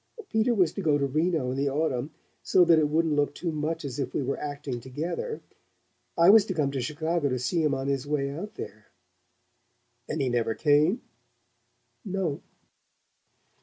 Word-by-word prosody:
"Peter 220 +2 +2
was 180 -6 +3
to - - -4
go 150 -2 +3
to 140 - 0
Reno 155 -1 0
in 130 - -3
the 140 +1 +1
autumn 140 -2 -1 0.3
so 180 - +4
that 165 -2 +6
it 150 -1 +2
wouldn't 160 0 +2
look 145 0 +1
too 170 - -3
much 155 +1 -3
as 135 0 -5
if 130 -2 -3
we - - 0
were 135 +2 -2
acting 145 -4 -4
together. 165 - -4 0.8
I 170 +3 +7
was 220 -1 +7
to 190 - -4
come 145 -4 +1
to 135 -2 -2
Chicago 155 +2 -1
to 130 - -1
see 125 +8 0
him 150 -3 +2
on 135 +1 -3
his 140 0 -1
way 140 -2 -1
out 175 +9 -7
there." 105 +1 -9 1.2
"And 155 - -2
he 135 - +1
never 115 -2 0
came?" 155 - +3 1.0
"No." 190 -7 -2
150 Hz, 180 wpm, -27 LUFS, 135-165 Hz, 1.2 s, I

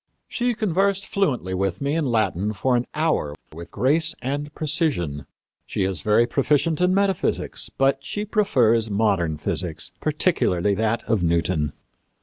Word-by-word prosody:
"She 245 -1 -1
conversed 195 -1 +1
fluently 130 - -1
with 95 -1 -1
me 140 +1 -1
in 160 -3 0
Latin 110 -3 0
for 125 +5 +1
an 120 0 0
hour 150 - 0 0.2
with 85 +2 -9
grace 160 +5 +1
and 145 +3 -3
precision. 135 - -1 0.4
She - - -1
is 95 -1 -2
very 105 +2 +3
proficient 150 +6 +1
in 180 0 +4
metaphysics; 195 -2 0
but 135 0 +1
she 210 +7 -4
prefers 125 - +2
modern 100 -7 +1
physics, 80 +1 -3
particularly 145 - +1
that 110 +3 0
of 110 -4 0
Newton." 85 -2 +1
125 Hz, 140 wpm, -23 LUFS, -, 0.4 s, in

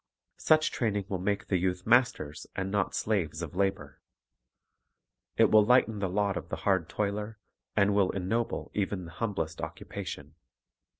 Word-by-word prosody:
Such 155 0 +3
training 105 -4 -1
will 95 - -2
make 100 +2 -1
the 95 - +1
youth 90 0 -1
masters 120 - +2
and 95 0 -2
not 100 -2 0
slaves 85 -7 -1
of 80 - -6
labor. 95 -7 -1 1.4
It - - +5
will 110 -1 +7
lighten 110 -2 +3
the 95 -2 -1
lot 100 +1 0
of - - -7
the - - -2
hard 95 -5 +2
toiler, 105 +1 -2 0.4
and 100 -1 +3
will 100 -2 +3
ennoble 110 +5 -2
even 95 -2 -2
the 85 - -10
humblest 85 -6 -3
occupation. - - -7
100 Hz, 155 wpm, -29 LUFS, 90-105 Hz, 1.4 s, will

